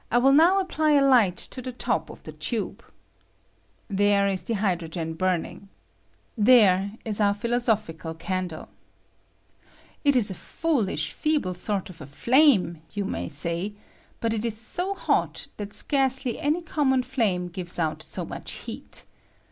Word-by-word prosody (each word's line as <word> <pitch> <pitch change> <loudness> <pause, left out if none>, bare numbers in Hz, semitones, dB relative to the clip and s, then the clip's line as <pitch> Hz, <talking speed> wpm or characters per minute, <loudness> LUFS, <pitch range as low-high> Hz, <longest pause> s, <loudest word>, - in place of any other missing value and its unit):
I 240 - +2
will 265 +3 +5
now 335 +7 +6
apply 315 -5 +1
a 285 -1 +5
light 230 -9 +4
to 255 - -5
the 255 - -5
top 245 - -1
of - - -12
the - - -8
tube. - - -4 1.0
There 200 -1 +3
is 195 -2 -1
the 230 - -2
hydrogen 170 -5 -2
burning. 185 +3 -2 0.7
There 205 -4 +5
is 215 -1 -2
our 200 -1 +3
philosoph 235 0 +1
ical 160 0 -8
candle. 185 -3 -4 1.3
It 285 -2 +4
is 220 -5 +3
a - - -3
foolish, 195 - -1
feeble 300 -12 0
sort 195 +1 -3
of 165 -2 -15
a 140 - -8
flame, 220 - +3
you 205 -2 -3
may - - -3
say, 170 +7 -3 0.4
but 230 -1 0
it 220 -1 -2
ig 230 -2 0
so 355 - -2
hot - - 0
that 205 -1 -6
scarcely 265 +2 0
any 315 +3 0
common 265 -5 +1
flame 220 -9 0
gives 175 0 -5
out 155 -2 -1
so 155 - -4
much - - -7
heat. - - -8
210 Hz, 155 wpm, -25 LUFS, 180-260 Hz, 1.3 s, now